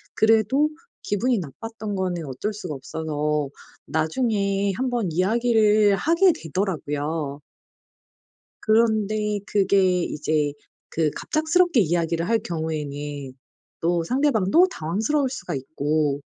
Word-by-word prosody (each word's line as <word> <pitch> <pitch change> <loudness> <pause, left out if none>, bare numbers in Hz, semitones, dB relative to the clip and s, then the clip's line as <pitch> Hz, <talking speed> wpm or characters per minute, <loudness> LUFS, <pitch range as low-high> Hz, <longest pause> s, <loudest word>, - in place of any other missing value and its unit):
그래도 225 +7 +3 0.3
기분이 235 +4 +1
나빴던 215 - -6
거는 180 -3 -2
어쩔 135 +10 -3
수가 190 -7 -6
없어서 150 0 -2 0.4
나중에 200 +3 0
한번 245 -5 -1
이야기를 215 +2 +3
하게 335 - +4
되더라고요. 150 -4 -3 1.2
그런데 215 -2 +2
그게 190 -3 +3
이제 150 -1 -1 0.4
그 155 -2 +1
갑작스럽게 330 -4 +2
이야기를 170 0 0
할 230 0 +2
경우에는 145 -5 -4 0.5
또 170 0 +1
상대방도 265 - +3
당황스러울 220 - -1
수가 260 - -5
있고 145 +1 -1
190 Hz, 255 characters per minute, -24 LUFS, 155-225 Hz, 1.2 s, 하게